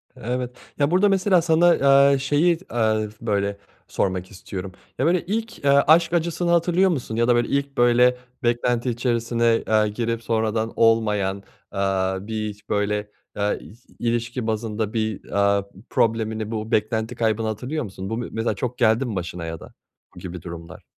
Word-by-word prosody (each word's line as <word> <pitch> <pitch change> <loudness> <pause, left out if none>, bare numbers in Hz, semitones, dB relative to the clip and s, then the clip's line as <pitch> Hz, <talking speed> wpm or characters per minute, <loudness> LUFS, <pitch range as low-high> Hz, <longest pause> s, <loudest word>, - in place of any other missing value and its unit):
Evet. 125 +1 -4 0.2
Ya 145 +3 +2
burada 195 +3 +4
mesela 190 -2 +3
sana, 170 +1 +4 0.4
eee, 135 - +2
şeyi, 150 +5 +2
eee, 110 -2 +1
böyle, 100 -2 -1 0.3
sormak 95 -1 -2
istiyorum. 95 0 -7 0.3
Ya 135 - +2
böyle 170 0 +2
ilk, 225 +4 -3
eee, - - +4
aşk 160 +5 +5
acısını 170 +1 0
hatırlıyor 175 +2 +3
musun 125 -8 -3
ya 115 +1 +2
da, 120 - +4
böyle, 120 0 +1
ilk 140 0 -2
,böyle, 120 +1 +4 0.3
beklenti 120 +1 +1
içerisine, 115 -1 +1
eee, 110 -1 +3
girip 115 +1 -3
sonradan 110 0 -1
olmayan, 105 -4 +2 0.4
eee, 100 - -4 0.5
bir 110 -1 -2
hiç 105 0 -13
böyle, 105 0 -1 0.3
eee, 105 0 0
i 105 - -13 0.2
ilişki 120 0 -2
bazında 110 -1 -2
bir, 110 -2 -2
eee, 100 0 +1 0.3
problemini, 110 -1 0
bu 110 0 -4
beklenti 110 +2 0
kaybını 110 -1 0
hatırlıyor 125 +8 -3
musun? 95 -1 -7
Bu 115 - -2
me 120 - -4
mesela 110 -1 -1
çok 125 +5 -4
geldi 115 +2 +3
mi 110 -5 -4
başına 85 -1 -4
ya 80 0 -5
da - - -13 0.4
bu - - -10
gibi 90 -2 -7
durumlar? 85 -1 -9
115 Hz, 165 wpm, -23 LUFS, 105-130 Hz, 0.5 s, aşk